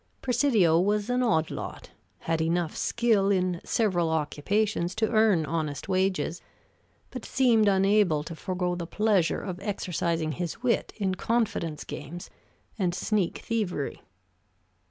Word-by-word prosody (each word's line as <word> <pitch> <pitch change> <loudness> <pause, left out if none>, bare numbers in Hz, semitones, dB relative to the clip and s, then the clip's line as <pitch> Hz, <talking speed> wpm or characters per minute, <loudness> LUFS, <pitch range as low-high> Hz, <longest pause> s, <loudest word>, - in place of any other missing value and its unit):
Presidio 235 - +3
was 205 +4 +1
an 250 +1 +1
odd 165 -10 +1
lot; - - -7 0.3
had 165 -1 -1
enough 165 0 0
skill 225 -5 +2
in 180 -3 +1
several 180 -7 +1
occupations 175 +5 0
to 220 - +1
earn 215 -7 +3
honest 155 -4 -3
wages, 185 -2 0 0.7
but 255 -3 -7
seemed 235 -5 +3
unable 195 -5 +3
to 165 - -7
forego 180 +1 -2
the 175 -1 -4
pleasure 205 -4 +1
of 185 -2 -5
exercising 170 -5 -2
his 175 - -5
wit 245 -2 +1
in 195 -3 0
confidence 210 -8 -1
games 170 +5 -8 0.5
and 180 -3 0
sneak 200 -1 -1
thievery. 200 -11 -2
185 Hz, 130 wpm, -27 LUFS, 165-215 Hz, 0.7 s, Presidio